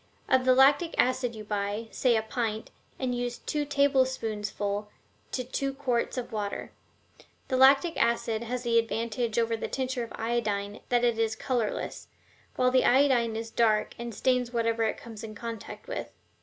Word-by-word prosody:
Of 260 -1 +3
the 255 0 +5
lactic 285 +5 +5
acid 250 -2 +1
you 215 - -7
buy, 205 +1 -2
say, 250 -3 +2
a 220 - +1
pint, 220 -2 -3 0.3
and 255 -2 -1
use 245 0 -2
two 295 -1 -2
tablespoonsful 225 -7 0 0.4
to 255 - -2
two 275 +2 -2
quarts 255 -3 -1
of 250 - -4
water. 205 -2 -4 0.8
The 260 - +1
lactic 275 +6 +6
acid 230 -1 +1
has 250 +1 -3
the 230 -1 +4
advantage 230 0 -2
over 230 0 +2
the 225 - -4
tincture 260 -2 -2
of 230 - -8
iodine 210 -3 -2
that 245 -1 +2
it 235 -2 +2
is 225 0 +1
colorless, 235 -2 -2 0.5
while 250 0 +3
the 255 0 +4
iodine 250 -4 +4
is 225 0 -5
dark 220 -2 +2
and 235 0 -4
stains 250 -1 +1
whatever 230 -1 0
it 220 - -1
comes 225 -2 -10
in 215 -1 -7
contact 230 - -7
with. - - -4
235 Hz, 170 wpm, -28 LUFS, 225-255 Hz, 0.8 s, lactic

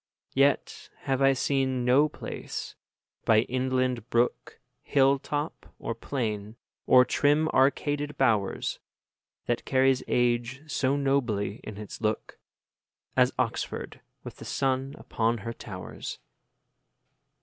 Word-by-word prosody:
10 - - -3
Yet 140 0 +1
have 135 -1 -1
I 135 0 +6
seen 130 -1 0
no 140 +5 +5
place, - - -6 0.5
by 110 -1 +5
inland 130 -1 -1
brook, 120 +1 0 0.2
Hill 135 0 +3
top, 145 +3 -5
or 115 - -3
plain, 110 -3 -3 0.3
or 125 0 +7
trim 150 +4 +3
arcaded 145 +2 +1
bowers, 110 -7 +1 0.7
That 120 -1 -1
carries 130 -1 +3
age 120 +2 +1
so 140 -3 0
nobly 120 -8 0
in 110 -2 -8
its 105 +1 -8
look, 110 -1 -2 0.8
As - - +4
Oxford - - -3 0.2
with - - -9
the - - -10
sun 135 +1 -1
upon 115 +1 0
her 115 - -3
towers. 95 -4 -7
130 Hz, 115 wpm, -28 LUFS, 115-135 Hz, 0.8 s, or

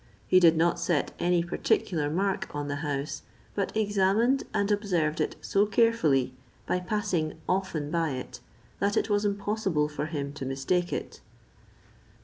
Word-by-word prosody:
He 185 - +5
did 165 -2 +6
not 170 +1 +2
set 165 -5 0
any 175 -1 +2
particular 165 -2 0
mark 190 +1 -1
on 145 0 -3
the 145 0 -2
house, 145 -1 -3 0.3
but 200 +1 -2
examined 210 +5 +2
and 200 +1 0
observed 175 -7 0
it - - -1
so 200 +1 +2
carefully, 195 - +2 0.3
by 180 - 0
passing 180 -5 -1
often 175 -6 -1
by 165 -3 0
it, 130 -1 -6 0.4
that 200 0 +1
it - - +1
was 205 0 +2
impossible 200 -6 0
for 150 0 -4
him 145 -3 -4
to 145 -2 -7
mistake 140 +7 -1
it. - - -5
175 Hz, 150 wpm, -28 LUFS, 150-200 Hz, 0.4 s, did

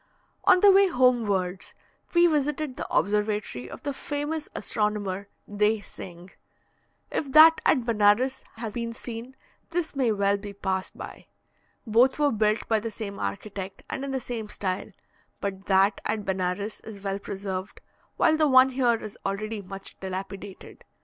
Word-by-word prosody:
On 360 - +6
the 405 - +8
way 390 +1 +6
homewards, 220 - +1 0.4
we 345 0 +7
visited 295 -3 0
the - - -6
observatory 210 - 0
of - - -10
the 285 -2 -2
famous 295 +1 -4
astronomer, 205 -2 -1 0.2
Dey 210 +1 +1
Singh. 180 -2 -11 0.8
If 275 - -2
that 320 +1 +8
at 255 -6 +3
Benares 230 +3 +3
has 225 -2 -5
been 230 -1 -3
seen, 235 +2 -7 0.3
this 335 -3 -2
may 255 -4 +2
well 200 -1 +2
be 200 0 -8
passed 190 -1 -3
by. - - -9 0.6
Both 235 +4 +4
were 295 -1 +3
built 215 0 +1
by 220 -1 +2
the 230 +2 -4
same 205 -2 -6
architect, 190 - -5
and 270 - -3
in 275 - -3
the 265 -1 -1
same 230 -4 -5
style; 185 -2 -3 0.5
but 195 -1 -5
that 195 +1 +3
at 215 -1 -2
Benares 190 +2 -2
is 205 -3 -10
well 195 0 -2
preserved, 195 -1 -5 0.4
while 315 - +4
the 310 -1 +4
one 260 -1 +7
here 250 -2 +2
is 215 -2 -8
already 210 +2 -3
much 195 0 -9
dilapidated. 195 +1 -7
215 Hz, 155 wpm, -26 LUFS, 195-260 Hz, 0.8 s, the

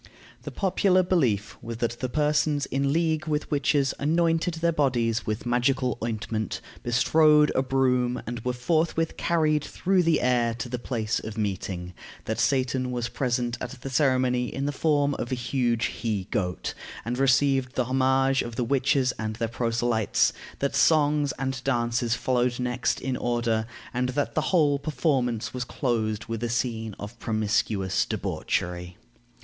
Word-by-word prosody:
The - - -6
popular 185 -1 +2
belief 125 - 0
was 115 0 -6
that 120 0 -2
the 130 - -2
persons 150 0 +1
in 140 +1 0
league 160 0 0
with 150 0 -2
witches 145 -1 +2
anointed 165 +3 +1
their 170 +1 +1
bodies 120 -7 0
with 110 +2 -2
magical 125 0 +1
ointment, 110 -2 -3 0.2
bestrode 150 +5 +4
a - - +2
broom, 125 -2 +1
and 120 0 -4
were 125 - 0
forthwith 160 +5 0
carried 155 -3 +1
through 185 +3 +1
the 165 -3 +3
air 120 -2 +2
to 115 +1 -5
the 125 0 -4
place 115 -3 -2
of 110 0 -7
meeting; 95 -3 -3 0.3
that - - -2
Satan 130 -1 +1
was 120 -1 -2
present 120 -2 -1
at 125 +1 -6
the 135 - -5
ceremony 130 -3 +2
in 135 - -3
the 145 - 0
form 145 -1 +1
of 120 - -4
a - - +1
huge 120 -1 0
he 105 -3 -2
goat, 90 -3 -2 0.3
and 120 +2 -2
received 135 -1 +2
the 125 - +1
homage 135 +1 +2
of 120 -1 -6
the 125 - 0
witches 135 +1 +2
and 110 0 -3
their 115 +1 -1
proselytes; 115 -1 +1 0.2
that 140 - -1
songs 150 -2 +3
and 130 -1 -3
dances 120 -2 0
followed 125 -1 0
next 125 0 0
in 130 0 -2
order, 120 -2 0 0.3
and 125 +1 0
that 145 +3 -1
the 155 - +1
whole 150 -6 +3
performance 130 -6 -1
was 125 -1 -2
closed 110 -5 -1
with 115 0 -4
a 120 - -1
scene 115 -2 -2
of 105 +3 -9
promiscuous 105 -3 0
debauchery. 90 +1 -3
125 Hz, 160 wpm, -26 LUFS, 115-145 Hz, 0.3 s, bestrode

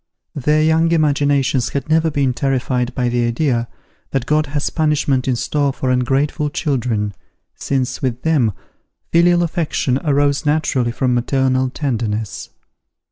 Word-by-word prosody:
Their 150 +2 +1
young 160 +1 +3
imaginations 145 -4 +2
had 140 -2 -4
never 160 +1 +2
been 140 -4 0
terrified 130 -1 -1
by 125 -1 0
the 120 0 0
idea 120 0 0 0.4
that 135 -3 -2
God 150 +1 +1
has 145 0 -2
punishment 150 -5 +1
in 130 - +2
store 140 +4 0
for 130 -1 -2
ungrateful 135 +4 0
children, 120 -9 -1 0.4
since, 130 -2 -2
with 125 -1 -2
them, 145 -9 +2 0.6
filial 175 +1 +4
affection 155 -6 -1
arose 145 -2 +1
naturally 145 -5 +1
from 125 +1 0
maternal 130 +1 +1
tenderness. 115 -6 -3
135 Hz, 135 wpm, -18 LUFS, 125-150 Hz, 0.6 s, filial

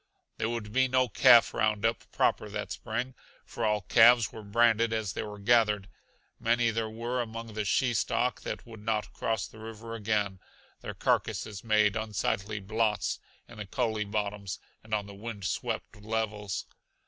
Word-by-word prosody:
There 110 - -1
would 110 -3 -4
be 130 +1 +4
no 130 0 +3
calf 120 +1 +6
roundup 110 0 0
proper - - +1
that - - -5
spring, 120 +4 -3 0.3
for 120 - -5
all 105 -1 +2
calves 115 +2 +6
were 110 - -8
branded 115 +2 +3
as 110 -3 -1
they - - -3
were 105 -1 -6
gathered. 105 -2 +3 0.5
Many 115 0 +2
there 110 0 -2
were 120 +3 -2
among 115 -1 -6
the 105 0 -2
she 125 +4 +2
stock 110 - 0
that - - -5
would 115 -2 -11
not 105 0 -2
cross 110 -3 -1
the 110 - -13
river 115 +1 -8
again; 105 -3 -1 0.4
their - - -6
carcasses 105 -3 -1
made 105 -2 +3
unsightly 110 -1 -1
blots 110 +1 0 0.3
in 115 -2 -12
the 105 - -5
coulee 110 -1 0
bottoms 100 -2 -3 0.3
and 110 0 -1
on 105 -1 -2
the 100 - -10
wind 105 -1 -7
swept - - -3
levels. 105 -2 -2
110 Hz, 165 wpm, -29 LUFS, 105-115 Hz, 0.5 s, calf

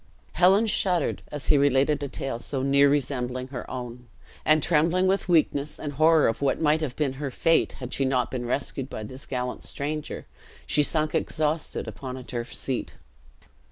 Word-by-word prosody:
Helen 190 +6 +4
shuddered, 185 -6 +1
as 145 -2 -5
he 145 - +5
related 140 +1 +3
a 140 - -2
tale 135 -3 -4
so 130 +2 -2
near 140 +1 +5
resembling 130 -2 -1
her 130 -2 -7
own; 125 -1 -7 0.4
and 155 -1 +4
trembling 170 +3 +3
with 190 0 +1
weakness, 150 -3 +2
and 145 -2 -5
horror 155 +2 +4
of 115 - -2
what 140 -1 +1
might 155 0 +2
have 140 -5 -3
been 145 -4 0
her 140 - -2
fate 165 +5 +2
had 125 0 -7
she 135 - +1
not 130 -2 0
been 120 -2 -3
rescued 135 +1 -2
by 110 - -6
this 130 +6 -10
gallant 125 -1 -3
stranger, 150 +1 -4 0.4
she 150 - +2
sunk 155 +1 +1
exhausted 155 0 -1
upon 130 -1 -6
a 130 - -8
turf 120 0 -5
seat. 130 -2 -3
140 Hz, 180 wpm, -26 LUFS, 130-155 Hz, 0.4 s, he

